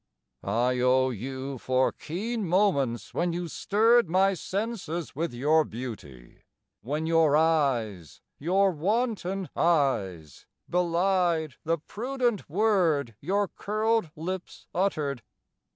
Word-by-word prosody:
I 120 Hz, +5 st, +1 dB
owe 130 Hz, +1 st, +3 dB
you 130 Hz, +3 st, -5 dB
for 130 Hz, +2 st, +1 dB
keen 215 Hz, +5 st, -4 dB
moments 150 Hz, -, +1 dB
when 175 Hz, 0 st, 0 dB
you 175 Hz, 0 st, -3 dB
stirred 225 Hz, +5 st, +3 dB
My 190 Hz, +3 st, +3 dB
senses 185 Hz, -5 st, -4 dB
with 165 Hz, +4 st, -2 dB
your 150 Hz, +6 st, +3 dB
beauty, 105 Hz, -, -9 dB, 0.4 s
when 150 Hz, +8 st, -3 dB
your 160 Hz, -2 st, +4 dB
eyes 130 Hz, -, 0 dB, 0.2 s
(Your 190 Hz, +5 st, +2 dB
wanton 195 Hz, +1 st, -1 dB
eyes) 100 Hz, -, 0 dB, 0.2 s
belied 175 Hz, -3 st, +1 dB
the 165 Hz, +1 st, +1 dB
prudent 240 Hz, -, -2 dB
word 170 Hz, -, +2 dB
Your 200 Hz, +6 st, 0 dB
curled 215 Hz, -1 st, -1 dB
lips 180 Hz, +3 st, -6 dB
uttered. 150 Hz, -, -1 dB
165 Hz, 105 wpm, -27 LUFS, 130-195 Hz, 0.4 s, your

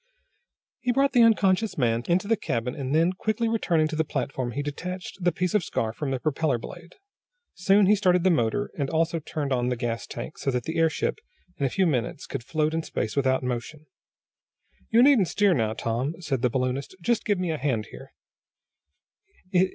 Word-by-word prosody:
He 250 Hz, -, 0 dB
brought 275 Hz, +2 st, +2 dB
the 245 Hz, -, +5 dB
unconscious 215 Hz, -2 st, +3 dB
man 115 Hz, -4 st, +1 dB
into 180 Hz, +3 st, +1 dB
the 225 Hz, -, +3 dB
cabin, 125 Hz, -, -2 dB
and 135 Hz, -1 st, -2 dB
then, 165 Hz, +3 st, +3 dB
quickly 220 Hz, +4 st, -1 dB
returning 170 Hz, -8 st, +1 dB
to 155 Hz, -, -4 dB
the 160 Hz, -, +2 dB
platform, 130 Hz, -4 st, -3 dB
he 145 Hz, -, -2 dB
detached 180 Hz, +7 st, -6 dB
the 175 Hz, -, +3 dB
piece 180 Hz, +2 st, -2 dB
of 210 Hz, -4 st, +2 dB
scarf 110 Hz, -5 st, -2 dB
from 150 Hz, -, -3 dB
the 135 Hz, -1 st, -1 dB
propeller 150 Hz, -1 st, 0 dB
blade. 175 Hz, +8 st, -10 dB, 0.7 s
Next 195 Hz, 0 st, +6 dB
he 210 Hz, -, +6 dB
started 180 Hz, -3 st, +2 dB
the 185 Hz, -, +4 dB
motor, 115 Hz, -9 st, 0 dB
and 140 Hz, -3 st, -2 dB
also 165 Hz, +1 st, 0 dB
turned 145 Hz, -2 st, -3 dB
on 125 Hz, -1 st, 0 dB
the 125 Hz, -, 0 dB
gas 115 Hz, -1 st, -3 dB
tank, -, -, -7 dB
so -, -, -1 dB
that 125 Hz, -2 st, -1 dB
the 160 Hz, +5 st, -3 dB
airship, 160 Hz, -, +1 dB, 0.4 s
in 140 Hz, -, +1 dB
a -, -, -2 dB
few 190 Hz, +8 st, +1 dB
minutes, 130 Hz, -4 st, -1 dB
could 135 Hz, -4 st, -5 dB
float 155 Hz, +3 st, 0 dB
in 165 Hz, -, 0 dB
space 110 Hz, -8 st, -3 dB
without 130 Hz, -1 st, +1 dB
motion. 125 Hz, +5 st, -4 dB, 1.0 s
"You 230 Hz, +2 st, +5 dB
needn't 260 Hz, -9 st, +5 dB
steer 205 Hz, +1 st, +3 dB
now, 110 Hz, -7 st, 0 dB
Tom," 120 Hz, +8 st, -2 dB
said 140 Hz, -8 st, -2 dB
the 125 Hz, -, +2 dB
balloonist. 130 Hz, +6 st, -2 dB
"Just 220 Hz, +7 st, 0 dB
give 205 Hz, -3 st, +1 dB
me 180 Hz, -2 st, -1 dB
a 155 Hz, -, -3 dB
hand 120 Hz, -7 st, -1 dB
here." 135 Hz, -, -11 dB
155 Hz, 195 wpm, -26 LUFS, 130-185 Hz, 1.0 s, Next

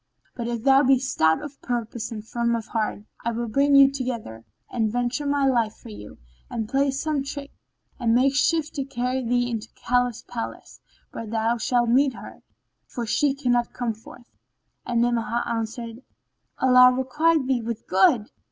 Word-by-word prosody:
But 235 Hz, -1 st, -4 dB
if 235 Hz, -2 st, -3 dB
thou 270 Hz, 0 st, +6 dB
be 270 Hz, -1 st, +4 dB
stout 245 Hz, -, +1 dB
of 290 Hz, -1 st, -9 dB
purpose 235 Hz, -1 st, -4 dB
and 215 Hz, -1 st, -7 dB
firm 235 Hz, 0 st, 0 dB
of 225 Hz, -2 st, -4 dB
heart, 215 Hz, -2 st, -2 dB, 0.2 s
I 235 Hz, -, 0 dB
will 235 Hz, +1 st, -3 dB
bring 280 Hz, +5 st, +3 dB
you 275 Hz, -1 st, +7 dB
together 240 Hz, -, -5 dB, 0.3 s
and 220 Hz, -3 st, 0 dB
venture 245 Hz, +4 st, -1 dB
my 280 Hz, -1 st, +1 dB
life 235 Hz, -5 st, +1 dB
for -, -, -13 dB
you, 105 Hz, -1 st, -10 dB, 0.3 s
and 220 Hz, -2 st, -3 dB
play 275 Hz, +4 st, +1 dB
some 280 Hz, +2 st, -1 dB
trick 280 Hz, 0 st, -7 dB, 0.5 s
and 230 Hz, -2 st, +2 dB
make 265 Hz, +2 st, +3 dB
shift 305 Hz, +2 st, +1 dB
to 280 Hz, -, -2 dB
carry 255 Hz, 0 st, -2 dB
thee 245 Hz, +1 st, +1 dB
into 225 Hz, -2 st, -4 dB
the -, -, -39 dB
Caliph's 245 Hz, -1 st, 0 dB
palace, 230 Hz, -1 st, -7 dB, 0.3 s
where 230 Hz, -, -7 dB
thou 225 Hz, +2 st, 0 dB
shalt 240 Hz, 0 st, +1 dB
meet 265 Hz, +2 st, +3 dB
her, -, -, -11 dB, 0.5 s
for 240 Hz, -, -5 dB
she 275 Hz, +5 st, +1 dB
cannot 245 Hz, -3 st, 0 dB
come 240 Hz, -2 st, -2 dB
forth." 225 Hz, +2 st, -16 dB, 0.5 s
And 235 Hz, -1 st, +1 dB
Ni'amah 235 Hz, -1 st, 0 dB
answered, 230 Hz, +1 st, -4 dB, 0.6 s
"Allah 250 Hz, -1 st, +6 dB
requite 300 Hz, +4 st, +1 dB
thee 255 Hz, -2 st, 0 dB
with 230 Hz, -1 st, -5 dB
good!" 205 Hz, +4 st, +3 dB
245 Hz, 175 wpm, -24 LUFS, 230-270 Hz, 0.6 s, you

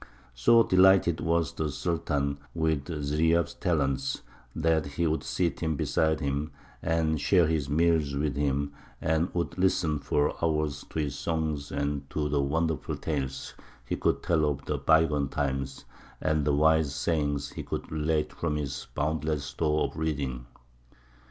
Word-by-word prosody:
So 115 Hz, -, +5 dB
delighted 95 Hz, -3 st, +5 dB
was 85 Hz, -2 st, +1 dB
the 80 Hz, -1 st, -2 dB
Sultan 70 Hz, -2 st, -1 dB, 0.2 s
with 80 Hz, -3 st, 0 dB
Ziryāb's 80 Hz, +2 st, +1 dB
talents 70 Hz, -6 st, -1 dB, 0.3 s
that 80 Hz, -1 st, +1 dB
he 70 Hz, +4 st, -1 dB
would 80 Hz, 0 st, +1 dB
seat 85 Hz, -2 st, -1 dB
him 80 Hz, -2 st, 0 dB
beside 80 Hz, +2 st, +1 dB
him, 70 Hz, +1 st, -2 dB, 0.3 s
and 80 Hz, -2 st, +1 dB
share 90 Hz, 0 st, +4 dB
his 75 Hz, -3 st, 0 dB
meals 80 Hz, -2 st, +2 dB
with 70 Hz, -1 st, -1 dB
him, 70 Hz, 0 st, 0 dB, 0.3 s
and 80 Hz, +2 st, +1 dB
would 85 Hz, +1 st, -2 dB
listen 90 Hz, -5 st, +2 dB
for 75 Hz, +1 st, +1 dB
hours 75 Hz, -3 st, 0 dB
to -, -, -7 dB
his 70 Hz, -2 st, -2 dB
songs 80 Hz, -3 st, -2 dB
and 70 Hz, -1 st, -2 dB
to 75 Hz, -1 st, -1 dB
the 70 Hz, -1 st, +1 dB
wonderful 80 Hz, +2 st, -1 dB
tales 65 Hz, -4 st, -3 dB, 0.3 s
he -, -, -2 dB
could -, -, 0 dB
tell 80 Hz, -3 st, +2 dB
of 70 Hz, -1 st, -4 dB, 0.2 s
bygone 75 Hz, -4 st, +4 dB
times, 65 Hz, -1 st, -3 dB, 0.3 s
and 75 Hz, -2 st, +1 dB
the 75 Hz, -, +2 dB
wise 80 Hz, -1 st, +3 dB
sayings 70 Hz, -2 st, -1 dB
he -, -, -6 dB
could -, -, -5 dB
relate 75 Hz, 0 st, 0 dB
from 80 Hz, -3 st, -2 dB
his 70 Hz, -2 st, -4 dB
boundless 75 Hz, -1 st, -1 dB
stores 75 Hz, +1 st, 0 dB
of -, -, -13 dB
reading. 70 Hz, -6 st, -2 dB
75 Hz, 150 wpm, -28 LUFS, 70-80 Hz, 0.3 s, So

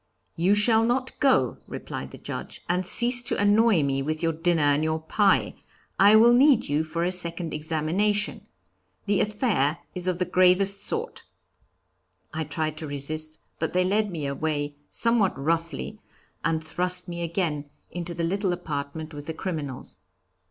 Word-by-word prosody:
'You 185 Hz, +5 st, +3 dB
shall 220 Hz, +2 st, +5 dB
not 250 Hz, +3 st, 0 dB
go,' 275 Hz, -2 st, +2 dB
replied -, -, -7 dB
the -, -, -11 dB
Judge, -, -, -7 dB
'and 180 Hz, +1 st, -1 dB
cease 245 Hz, +5 st, +6 dB
to 245 Hz, -, -2 dB
annoy 205 Hz, -3 st, +4 dB
me 135 Hz, -1 st, 0 dB
with 155 Hz, +4 st, -3 dB
your 165 Hz, 0 st, +1 dB
dinner 165 Hz, 0 st, +1 dB
and 145 Hz, +1 st, +2 dB
your 160 Hz, 0 st, 0 dB
pie; 195 Hz, +5 st, +2 dB, 0.5 s
I 200 Hz, +2 st, +7 dB
will 235 Hz, +2 st, +7 dB
need 265 Hz, 0 st, +4 dB
you 145 Hz, +2 st, 0 dB
for 165 Hz, +2 st, -3 dB
a 180 Hz, -, 0 dB
second 170 Hz, -2 st, -2 dB
examination. 165 Hz, +7 st, -1 dB, 0.6 s
The 205 Hz, -1 st, +1 dB
affair 205 Hz, -, 0 dB, 0.2 s
is 180 Hz, 0 st, -3 dB
of 180 Hz, -2 st, 0 dB
the 180 Hz, -, 0 dB
gravest 185 Hz, +2 st, +3 dB
sort.' 460 Hz, +1 st, -2 dB, 1.1 s
I 160 Hz, 0 st, -3 dB
tried 155 Hz, +1 st, -3 dB
to 155 Hz, -, -6 dB
resist, 155 Hz, +2 st, -3 dB, 0.2 s
but 160 Hz, -, -2 dB
they 180 Hz, 0 st, +3 dB
led 205 Hz, +3 st, +1 dB
me 160 Hz, -6 st, -5 dB
away 145 Hz, +1 st, -2 dB, 0.2 s
somewhat 230 Hz, -5 st, +1 dB
roughly, 165 Hz, +1 st, -2 dB, 0.4 s
and 160 Hz, 0 st, 0 dB
thrust 180 Hz, +3 st, -2 dB
me 170 Hz, -1 st, -5 dB
again 165 Hz, -4 st, -2 dB, 0.2 s
into 175 Hz, -1 st, -5 dB
the 170 Hz, -, -3 dB
little 190 Hz, +2 st, 0 dB
apartment 155 Hz, -1 st, -5 dB
with 145 Hz, 0 st, -9 dB
the 160 Hz, -, -4 dB
criminals. 155 Hz, -7 st, -4 dB
170 Hz, 160 wpm, -25 LUFS, 155-200 Hz, 1.1 s, I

